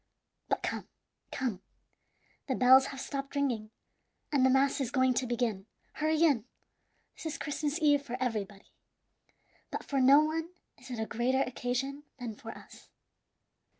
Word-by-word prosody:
"But - - 0
come, - - -3 0.4
come, 235 -8 -2 0.9
the 260 - 0
bells 260 +1 +7
have 270 - -7
stopped 275 +1 -5
ringing, 245 -7 0 0.6
and 280 -3 +3
the 260 - +6
mass 270 +2 +3
is 255 - -1
going 260 0 +3
to 250 +1 -1
begin. 230 -5 -1 0.3
Hurry 310 +1 +1
in. 275 -9 +3 0.7
This - - -6
is 315 - -4
Christmas 295 +1 -2
Eve 290 -3 +4
for 250 -3 -5
everybody, 210 -5 -3 1.0
but - - -4
for 275 -1 0
no 275 +3 +8
one 320 +2 -2 0.3
is 255 0 -13
it 245 -3 -4
a 220 - -1
greater 255 +4 +1
occasion 255 +3 -3 0.2
than 245 -4 -5
for 225 - -10
us." - - -12
260 Hz, 150 wpm, -31 LUFS, 240-280 Hz, 1.0 s, no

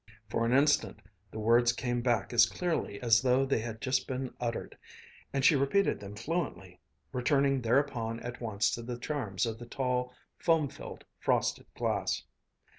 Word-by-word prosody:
For 115 +1 0
an - - +1
instant 145 +3 +3 0.3
the - - -9
words 120 +2 +4
came 120 0 -2
back 120 -3 0
as 115 -1 +7
clearly 165 - -2
as 115 -1 +5
though 130 +1 +3
they 135 -3 +1
had 110 0 -6
just 130 0 0
been 130 -1 -4
uttered, 120 -1 -3 0.6
and 135 -1 0
she 155 - +7
repeated 140 +9 +2
them 100 0 -9
fluently, 105 - -4 0.3
returning 135 +1 +2
thereupon 115 -2 0
at 120 0 -7
once 110 -2 0
to 120 - -3
the 120 +1 -5
charms 120 -7 -2
of 115 -1 -4
the 120 - -9
tall, 125 0 -1 0.3
foam 160 -4 +2
filled - - -10
frosted - - 0
glass. - - -1
120 Hz, 165 wpm, -31 LUFS, 115-135 Hz, 0.6 s, as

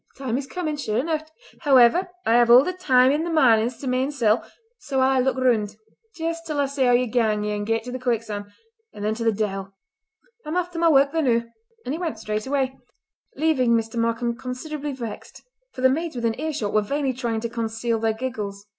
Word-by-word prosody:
the 275 - -10
time 235 -2 0
is 270 +1 -3
comin', 315 -1 -3
sure 220 -7 -2
eneucht! 310 +3 -2 0.3
However 280 +5 +5 0.2
I 225 - +3
have 240 0 +5
all 245 +2 +9
the 365 - -2
time 260 -8 +4
i' 290 - +2
the 330 +2 -2
marnins 240 -7 +3
to 275 - -5
my 255 0 +1
ain 260 +2 0
sel', 235 -5 +2 0.4
so 270 -2 -2
I'll 265 0 +3
aye - - +3
look 265 +1 +1
roond 225 -5 +1 0.4
jist 330 0 -4
till 290 -3 0
see 275 -1 0
how 245 - +4
ye 250 +1 +3
gang 220 -3 +1
yer 210 0 -2
ain 205 0 -3
gait 225 +1 0
to 250 - -7
the 255 - -5
quicksan', 220 -4 -3 0.4
and 205 - -6
then 215 - +1
to 230 +1 -4
the 225 - +3
de'il! 195 -2 -3 0.7
I'm 310 +4 -3
aff 355 0 -1
till 335 -1 -4
ma 335 - +5
wark 280 -2 +4
the 325 - 0
noo!" 235 -5 +2 0.4
And 265 - -2
he 320 - -4
went 330 -10 -3
straightway, 260 +5 -2 0.6
leaving 270 -6 +2
Mr. 225 0 -2
Markam 230 +1 0
considerably 280 +4 -5
vexed, 235 -5 -8 0.3
for - - -8
the 260 - +6
maids 320 +3 -2
within 230 0 -1
earshot 300 -10 -2
were 215 - +4
vainly 275 +5 -1
trying 235 -3 -2
to 235 - -3
conceal 225 0 -2
their 225 0 +1
giggles. 210 -4 -5
250 Hz, 220 wpm, -23 LUFS, 225-285 Hz, 0.7 s, all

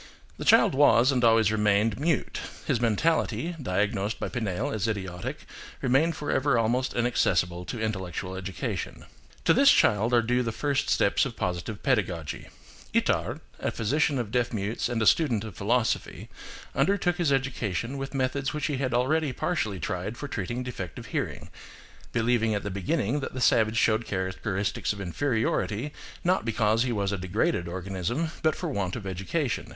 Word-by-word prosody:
The - - -6
child - - +6
was, 130 -2 +5
and 125 -2 +1
always 115 -2 +5
remained, 105 +1 +2
mute; 160 0 0 0.3
his 120 - 0
mentality, 160 +8 +1
diagnosed 105 0 -1
by - - -3
Pinel 105 -7 -2
as 110 0 -1
idiotic, 95 -5 -4 0.3
remained 135 +6 +2
forever 140 -3 +1
almost 120 +3 +1
inaccessible 90 -7 +1
to 120 - -5
intellectual 95 -4 -3
education. 95 -1 -4 0.4
To - - +6
this - - +6
child 110 +3 +3
are 120 - +4
due 125 +2 +1
the 115 -2 -1
first 140 +4 -1
steps - - +3
of - - -3
positive 90 +4 -3
pedagogy. 90 - -1 0.5
Itard, - - +1 0.2
a - - -1
physician 140 +5 +1
of 115 -4 -3
deaf 120 -1 +1
mutes 105 +1 -2
and 120 -2 -1
a - - +1
student 120 -6 +3
of 110 -3 -7
philosophy, 115 +4 -1 0.4
undertook 180 -3 +1
his 170 -6 +1
education 125 -4 -1
with 135 +1 -5
methods 135 +2 -1
which 150 - -2
he 145 -3 -1
had 130 -2 -1
already 145 +4 +2
partially 110 - -2
tried 95 +8 -3
for 145 - -5
treating 120 +2 -3
defective 95 - -6
hearing–believing 115 -1 -2
at 100 - -2
the 105 - -3
beginning 100 +7 0
that 130 - -5
the - - -3
savage 110 -2 +3
showed 110 0 +2
char 95 -1 -1
acteristics 100 +2 -2
of 100 - -10
inferiority, 110 - -1 0.3
not 185 +2 +2
because 110 0 +1
he 125 0 +1
was 100 -3 0
a 100 - -2
degraded 95 - 0
organism, 95 - -3
but 155 -1 +2
for 180 - -4
want 95 -9 -2
of 110 -5 -6
education. 95 - -2
115 Hz, 165 wpm, -27 LUFS, 100-130 Hz, 0.5 s, child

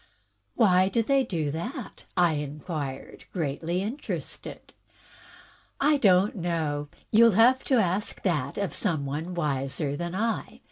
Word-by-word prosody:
"Why 190 -4 +4
do 230 +4 +1
they 275 +3 +3
do 160 - -2
that?" 230 - -6
I 175 -2 +4
inquired, 145 -1 -5
greatly 170 +2 -2
interested. 240 +8 -6 0.5
" - - -24
I - - +3
don't 195 -4 +4
know. 160 -5 -2 0.2
You'll 230 0 +6
have 250 +3 +5
to 265 - +3
ask 200 -2 +1
that 150 -8 -1
of 200 -1 -2
some 160 -9 -1
one 155 +6 -4
wiser 140 -2 -1
than 175 +3 -4
I. 225 +3 -2
175 Hz, 135 wpm, -27 LUFS, 150-210 Hz, 0.5 s, You'll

